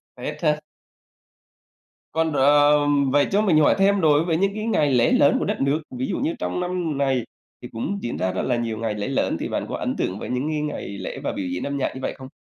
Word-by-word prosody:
Tết - - -6
hả? 150 -1 +2 1.5
Còn, 160 0 0
ờ, 145 +1 +5 0.4
vậy 145 +1 +3
cho 205 +1 +3
mình 185 -7 +3
hỏi 150 - +4
thêm 200 0 +3
đối 155 0 +4
với 165 -2 +1
những 195 +3 +1
cái 215 0 -3
ngày 150 -11 +2
lễ 120 -1 +3
lớn 140 - +4
của - - -1
đất - - -2
nước, 140 +3 +1 0.2
ví 130 - -1
dụ - - -2
như 310 +4 0
trong - - -2
năm 180 -4 -2
này 135 -4 +1 0.4
thì 125 - -7
cũng 190 - -3
diễn 120 - -4
ra 95 +3 0
rất 95 - -2
là 125 - +1
nhiều 115 -2 -2
ngày 110 -1 -2
lễ 105 -1 -3
lớn, 135 - 0
thì - - -3
bạn - - -2
có - - -3
ấn - - -2
tượng 95 +2 -2
với - - -6
những 125 +3 -1
cái 155 -1 -1
ngày 150 -1 -4
lễ 100 - -6
và - - -1
biểu 95 - -4
diễn 90 0 -3
âm 140 0 -3
nhạc 135 - -1
như 130 - -7
vậy - - -2
không? 130 - -9
145 Hz, 255 wpm, -23 LUFS, 125-160 Hz, 1.5 s, ờ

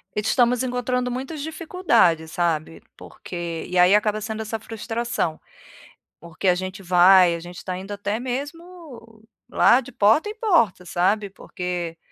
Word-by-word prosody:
Estamos 240 +3 +2
encontrando 250 0 -2
muitas 270 +4 -5
dificuldades, 240 - +1
sabe. 165 -2 -2 0.2
Porque 170 -2 -7
E 180 - -2
aí, 180 +2 +6
acaba 210 0 +1
sendo 220 +1 -5
essa 220 +1 -4
frustração. 225 -6 -3 0.8
Porque 170 +3 -5
a 180 - +5
gente 185 +1 -6
vai, 180 0 +5
a - - -6
gente 175 +1 -11
está 185 -1 -5
indo 195 +2 -9
até 205 +2 -3
mesmo 275 -3 -8 0.3
lá 255 - +4
de 275 - -12
porta 225 - +3
em 430 - -7
porta, 330 - +1
sabe? 195 +4 0
Porque, 180 -3 -6
210 Hz, 145 wpm, -23 LUFS, 180-250 Hz, 0.8 s, aí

